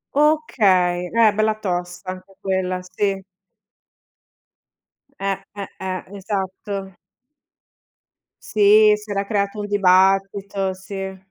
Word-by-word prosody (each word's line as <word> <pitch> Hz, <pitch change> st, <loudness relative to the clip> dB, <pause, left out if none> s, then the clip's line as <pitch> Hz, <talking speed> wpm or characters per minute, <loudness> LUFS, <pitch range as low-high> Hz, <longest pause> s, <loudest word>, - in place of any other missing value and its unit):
Okay, 200 Hz, -, +2 dB
eh, 225 Hz, -2 st, +4 dB
bella 215 Hz, 0 st, +1 dB
tosta 180 Hz, -1 st, -3 dB
anche 185 Hz, +1 st, -11 dB
quella, 185 Hz, -1 st, -1 dB
sì. 195 Hz, +1 st, -2 dB, 2.0 s
Eh, 195 Hz, -1 st, -1 dB, 0.2 s
eh, 200 Hz, -1 st, -5 dB
eh, 185 Hz, -1 st, -4 dB
esatto. 195 Hz, -1 st, -4 dB, 1.5 s
Sì, 210 Hz, 0 st, +5 dB
si 210 Hz, 0 st, -14 dB
era 200 Hz, 0 st, -1 dB
creato 200 Hz, 0 st, -1 dB
un 205 Hz, -, -4 dB
dibattito, 195 Hz, 0 st, +2 dB
sì. 190 Hz, 0 st, -7 dB
195 Hz, 95 wpm, -21 LUFS, 185-205 Hz, 2.0 s, Sì